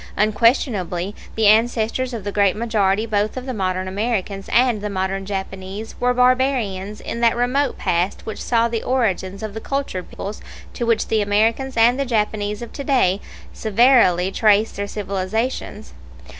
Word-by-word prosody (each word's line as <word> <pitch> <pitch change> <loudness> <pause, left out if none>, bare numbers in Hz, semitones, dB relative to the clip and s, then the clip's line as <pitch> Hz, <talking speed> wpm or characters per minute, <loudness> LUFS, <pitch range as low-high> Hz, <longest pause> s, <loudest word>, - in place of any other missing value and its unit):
Unquestionably 210 - +1 0.2
the 220 - +1
ancestors 230 +3 +2
of 230 -5 -5
the 205 - -3
great 200 -1 +2
majority 215 -2 +1
both 210 +1 -1
of 255 - -5
the 260 - -4
modern 185 -3 -2
Americans 200 -1 -2
and 240 -2 +3
the 210 - -3
modern 195 0 -2
Japanese 195 +1 -5
were 250 0 +2
barbarians 250 -6 +1
in 235 - -5
that 235 -1 +4
remote 260 +4 0
past 175 +2 -1
which 220 - -6
saw 230 -1 +2
the 230 -1 -3
origins 195 -6 -1
of 215 -2 -5
the 220 - -6
cultured 275 -10 -3
peoples 205 +2 -7 0.3
to 235 - -3
which 230 -1 +1
the 220 -1 +2
Americans 225 +6 +1
and 240 +3 +4
the 275 - 0
Japanese 210 -2 -1
of 235 - -10
to 280 - -5
day 210 -9 +2 0.3
severally 215 -5 +3
trace 215 +1 +3
their 200 0 -4
civilizations. 205 +4 -3
215 Hz, 160 wpm, -21 LUFS, 195-240 Hz, 0.3 s, that